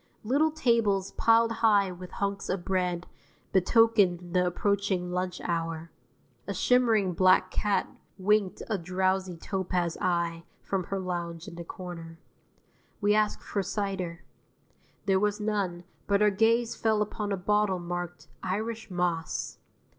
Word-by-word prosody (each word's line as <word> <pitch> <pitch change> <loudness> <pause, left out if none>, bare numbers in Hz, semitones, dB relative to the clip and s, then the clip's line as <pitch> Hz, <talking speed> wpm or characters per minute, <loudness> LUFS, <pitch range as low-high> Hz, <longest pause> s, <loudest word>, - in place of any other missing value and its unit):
Little 280 +8 +3
tables 230 -10 +1
piled 230 0 +4
high 205 -4 +3
with 180 0 -10
hunks 200 0 -2
of 185 -2 -2
bread 180 -2 0 0.5
betokened 190 -3 +3
the 180 -1 +3
approaching 190 -1 0
lunch 180 0 -2
hour. 165 -1 -3 0.6
A - - -3
shimmering 225 -7 +3
black 185 +1 +4
cat 205 -1 +1 0.3
winked 200 0 +1
a 215 -4 -1
drowsy 185 +1 0
topaz 180 -2 -2
eye 170 -2 0 0.2
from 190 -2 -2
her 195 - -3
lounge 175 -2 -4
in 200 - -8
the 170 0 -7
corner. 170 -2 -8 0.8
We 205 0 +3
asked 215 0 +1
for 200 - -2
cider. 190 -4 -3 0.8
There 190 -1 +3
was 210 +1 0
none, 200 -5 -1 0.2
but 200 0 +3
our 210 - +5
gaze 230 +3 +2
fell 220 -2 +2
upon 210 0 -4
a 200 - 0
bottle 210 0 +1
marked 175 0 -5
"Irish 220 +4 -3
Moss." 175 -3 -2
190 Hz, 135 wpm, -28 LUFS, 175-210 Hz, 0.8 s, our